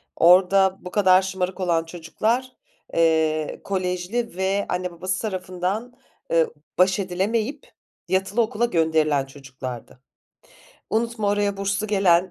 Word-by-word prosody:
Orada 190 +2 +5
bu 180 - -9
kadar 185 -2 +5
şımarık 190 0 -3
olan 170 -3 +1
çocuklar, 215 +10 -2 0.4
eee, 160 -2 +1
kolejli 185 +3 -2
ve 195 +1 0
anne 180 0 -2
babası 185 +2 -3
tarafından, 190 +3 -3 0.4
eee, 165 -1 +4 0.3
baş 185 +2 +3
edilemeyip 210 +8 -2 0.4
yatılı 195 +4 +1
okula 220 +1 0
gönderilen 160 - +1
çocuklardı. 130 -3 -9 0.9
Unutma 225 -1 0
oraya 205 0 +1
burslu 200 +2 -1
gelen 190 -3 +3
185 Hz, 110 wpm, -23 LUFS, 170-205 Hz, 0.9 s, Orada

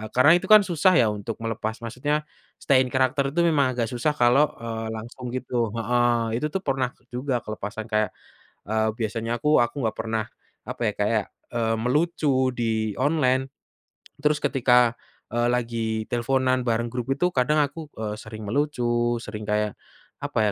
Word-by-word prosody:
karena 130 +5 +7
itu 190 - -7
kan 215 0 +9
susah 185 0 +3
ya 115 -6 +4
untuk 105 +2 -5
melepas 110 -1 -3
maksudnya, 145 +6 -1 0.3
stay 135 -2 +3
in 130 - +2
character 130 +2 +1
itu - - +1
memang 140 -6 +2
agak 115 -2 -1
susah 140 +5 0
kalau, 125 +4 +4 0.2
eee, 115 -1 -4
langsung 120 +3 -8
gitu, 120 -3 -2
heeh, 120 -1 +1
itu 150 - -1
tuh 185 +5 -4
pernah 135 -4 0 0.2
juga 125 -1 -2
kelepasan 110 0 -5
kayak, 110 -1 0 0.5
eee, 110 0 +2
biasanya 115 +1 -2
aku 150 0 +5
aku 120 - -4
nggak 110 -1 -1
pernah 110 -1 -1 0.4
apa - - -6
ya - - -14
kayak, - - +1 0.3
eee, 115 -1 +1
melucu 130 0 +1
di 110 -2 -1
online, 135 -2 +2 0.8
terus 150 0 +3
ketika, 125 -3 +3 0.4
eee, 120 +1 +1
lagi 115 -2 -1
teleponan 130 +1 +1
bareng 115 +1 0
grup 125 -1 -4
itu 180 +6 +1
kadang 145 0 +1
aku, 155 +2 -6
eee, 105 -1 -3
sering 110 -1 -9
melucu, 120 -3 0
sering 105 -1 -7
kayak, 105 0 0 0.5
apa - - -2
120 Hz, 160 wpm, -25 LUFS, 115-135 Hz, 0.8 s, kan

